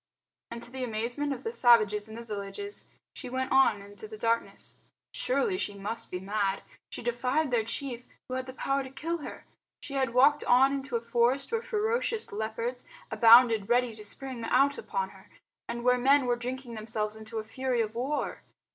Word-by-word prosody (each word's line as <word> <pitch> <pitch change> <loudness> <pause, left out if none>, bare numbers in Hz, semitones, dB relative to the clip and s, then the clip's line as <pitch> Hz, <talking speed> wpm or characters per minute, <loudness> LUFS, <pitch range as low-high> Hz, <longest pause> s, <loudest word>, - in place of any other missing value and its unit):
And 235 0 -6
to 240 - -6
the 260 0 -4
amazement 240 +5 -2
of 275 - -4
the 455 - -2
savages 215 - +4
in 220 - -8
the 235 0 -8
villages 215 - -6 0.3
she 255 - -7
went 260 +1 -2
on 260 -7 +4
into 205 +1 -10
the 215 0 -9
darkness. 230 +1 -1 0.4
Surely 485 -6 0
she 205 - -2
must 205 +3 -3
be 180 - -4
mad. 195 0 -1 0.3
She - - -6
defied 250 +5 0
their 235 -2 +2
chief 245 +1 -4 0.2
who 255 - -6
had 260 0 -3
the 260 - -7
power 275 +1 0
to 265 - -7
kill 330 +5 -3
her. 295 - -8 0.4
She 290 -1 -7
had 260 -3 0
walked 290 +3 +5
on 265 +3 +5
into 270 -2 -3
a 230 - 0
forest 240 - +1
where 460 -1 0
ferocious 450 +1 0
leopards 225 +4 -3 0.3
abounded 230 -3 +6
ready 245 -1 +3
to 215 -1 -10
spring 255 +3 -4
out 275 +5 +3
upon 190 -1 -2
her, 190 0 -17 0.4
and 235 0 -4
where 250 0 +4
men 270 +2 +4
were 245 -1 +2
drinking 250 0 -5
themselves 215 -1 -3
into 220 +1 -7
a 220 - -2
fury 250 +2 -1
of 215 -1 -2
war. 265 +6 -2
245 Hz, 190 wpm, -29 LUFS, 220-270 Hz, 0.4 s, abounded